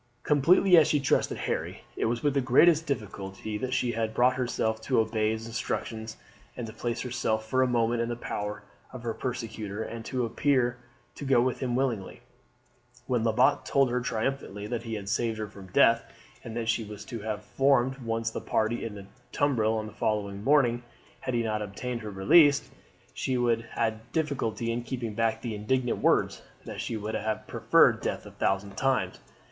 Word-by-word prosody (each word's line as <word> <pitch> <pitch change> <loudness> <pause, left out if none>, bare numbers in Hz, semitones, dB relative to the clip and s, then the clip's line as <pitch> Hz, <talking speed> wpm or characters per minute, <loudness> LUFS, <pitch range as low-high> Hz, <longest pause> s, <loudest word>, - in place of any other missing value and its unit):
Completely 170 +5 +5
as 155 -2 +7
she 150 -2 +2
trusted 135 - +1
Harry, - - -3
it - - -1
was 115 +1 -1
with 145 -2 +2
the 140 - +2
greatest 155 +6 +5
difficulty 105 -5 -4
that 130 +2 -3
she 125 -2 +1
had 110 -1 -2
brought 125 +1 +4
herself 110 -3 -1
to 125 +2 +1
obey 110 -1 +1
his 110 0 -3
instructions 110 -1 -4 0.4
and 120 - -4
to 110 - -8
place 120 +1 -3
herself 115 -3 -1
for 130 +3 +2
a 130 - +4
moment 120 -1 +1
in 115 - -1
the 120 - -2
power 105 -2 -4 0.3
of 130 -2 -9
her 115 -1 -2
persecutor, 110 -4 -4
and 115 0 -7
appear 125 0 +1 0.4
to - - -9
go 135 -3 +4
with 125 +1 +1
him 125 -2 -1
willingly. 125 -7 -2 0.8
When 120 -3 0
Lebat 125 +5 +3
told 135 -3 +2
her 125 0 0
triumphantly 115 -3 -3
that 120 +2 -3
he 115 -1 -5
had 100 -2 -6
saved 115 +2 0
her 110 -1 -3
from 100 -2 -12
death, 115 +5 +4 0.4
and 115 0 -6
that 115 -1 -2
she 115 0 +1
was 105 -1 -9
to 115 - -6
have 105 0 -4
formed 135 0 +2
one 115 -2 -2
of 115 0 -2
the - - -4
party 110 +2 0
in 110 -2 -5
the 100 -1 -9 0.3
tumbril 115 -6 +1
on 110 - -3
the 110 - -9
following 100 -2 -2
morning 125 -3 +3 0.4
had 130 - -3
he 120 - +1
not 110 -1 -1
obtained 115 +4 -4
her 110 - -6
release, 140 - +5 0.4
she 130 - -1 0.4
had 110 +1 -2
difficulty 135 -7 -1
in 120 +1 -2
keeping 120 -2 -4
back 115 +1 0
the 120 -3 -3
indignant 120 +4 0
words, - - +2 0.2
that - - -5
she 115 - -3
would 105 +1 -4
have 110 0 -2
preferred - - +4
death - - -3
a - - -10
thousand 100 +1 -1
times. 135 -1 0
115 Hz, 190 wpm, -28 LUFS, 110-130 Hz, 0.8 s, as